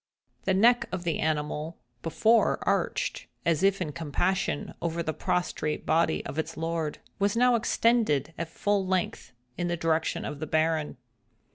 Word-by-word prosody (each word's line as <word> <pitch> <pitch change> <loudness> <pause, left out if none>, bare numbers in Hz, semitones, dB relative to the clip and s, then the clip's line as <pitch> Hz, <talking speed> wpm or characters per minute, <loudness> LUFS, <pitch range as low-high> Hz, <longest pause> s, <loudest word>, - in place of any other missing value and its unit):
The 190 - +2
neck 240 +5 +5
of 185 -2 -3
the 170 -2 -1
animal, 155 +1 -1 0.2
before 220 +8 +3
arched, - - -1 0.2
as 165 -1 +2
if 195 0 +3
in 165 -5 -2
compassion, 170 +2 -1
over 170 0 -1
the 155 - -2
prostrate 155 -4 -1
body 160 0 +2
of 155 - -4
its 160 - -3
lord, 165 -2 -2 0.2
was 200 +2 +1
now 250 +1 +5
extended, 220 - +2
at 170 0 -4
full 205 +3 0
length, 185 -1 -1 0.3
in 175 - 0
the 175 0 -1
direction 160 -1 0
of 145 - -5
the 155 - -4
Baron. 155 -1 0
170 Hz, 155 wpm, -28 LUFS, 155-195 Hz, 0.3 s, neck